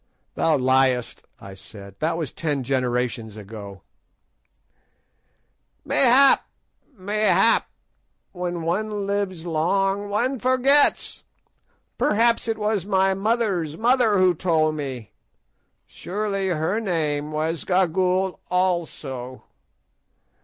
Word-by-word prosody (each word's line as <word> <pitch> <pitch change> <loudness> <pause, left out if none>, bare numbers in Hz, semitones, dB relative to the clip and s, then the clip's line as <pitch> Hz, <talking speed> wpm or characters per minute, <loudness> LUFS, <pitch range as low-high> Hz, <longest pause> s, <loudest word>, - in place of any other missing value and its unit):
"Thou 160 -2 +1
liest," 130 -1 +1
I 100 - -11
said, 100 0 -13
"that 165 +2 -1
was 160 -5 -4
ten 145 -5 -2
generations 125 -4 -2
gone." 100 -2 -10 2.0
"Mayhap, 270 +1 +5 0.5
mayhap; 210 +2 +2 0.6
when 175 -2 -4
one 205 +4 -2
lives 195 -4 -3
long 195 +5 0
one 245 +6 -1
forgets. 260 +3 +2 0.8
Perhaps 230 +2 +2
it 225 -1 -1
was 210 -3 -1
my 190 -1 +2
mother's 195 -6 -1
mother 235 -2 +3
who 185 -1 +4
told 155 -2 +1
me; 130 -8 -6 0.7
surely 195 0 -3
her 175 +4 -1
name 155 -6 -2
was 155 +1 -2
Gagool 185 +1 +1
also. 160 -9 -2
180 Hz, 95 wpm, -23 LUFS, 145-205 Hz, 2.0 s, Mayhap